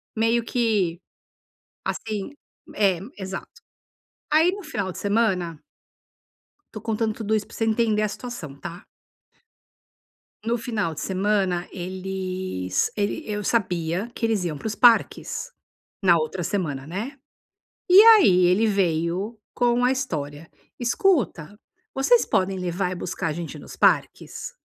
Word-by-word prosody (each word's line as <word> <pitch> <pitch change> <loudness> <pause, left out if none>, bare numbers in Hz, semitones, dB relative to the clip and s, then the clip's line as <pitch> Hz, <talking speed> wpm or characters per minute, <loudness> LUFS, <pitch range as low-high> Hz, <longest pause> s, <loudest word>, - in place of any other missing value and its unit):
meio 230 +2 +2
que, 210 -9 0 0.8
assim 215 +1 -3 0.4
é 195 -5 +2 0.2
exato. 190 0 -6 0.8
Aí 320 +4 +5
no 405 - -7
final 210 - -3
de - - -10
semana. 195 -7 0 1.1
Estou 215 - -7
contando 220 -1 -1
tudo 220 -1 -1
isso 210 -1 -1
para - - -17
você 225 - +1
entender 220 -1 +2
a 215 - +2
situação, 205 - -7
tá? 170 +6 -9 1.6
No 235 +2 0
final 215 -9 -2
de 150 - -6
semana 190 -2 0
eles 185 - -3
ele 205 +9 -1
eu 210 0 -3
sabia 180 -1 0
que 230 - -1
eles 220 -4 +1
iam 155 -4 -3
para - - -13
os 215 - -1
parques, 245 - +3 0.5
na 175 -3 +5
outra 165 +3 -2
semana, 150 -7 -2
né. 220 - -5 0.7
E 380 +3 +10
aí 370 - +7
ele 200 +6 +3
veio 190 +2 0
com 245 0 +2
a 250 - +4
história: 155 - -4 0.3
"Escuta, 235 - +1 0.4
vocês 360 - +4
podem 190 0 0
levar 180 +1 -1
e 185 - -3
buscar 170 -1 -3
a 155 - -2
gente 170 0 -6
nos - - -11
parques?" - - +1
200 Hz, 135 wpm, -24 LUFS, 175-230 Hz, 1.6 s, E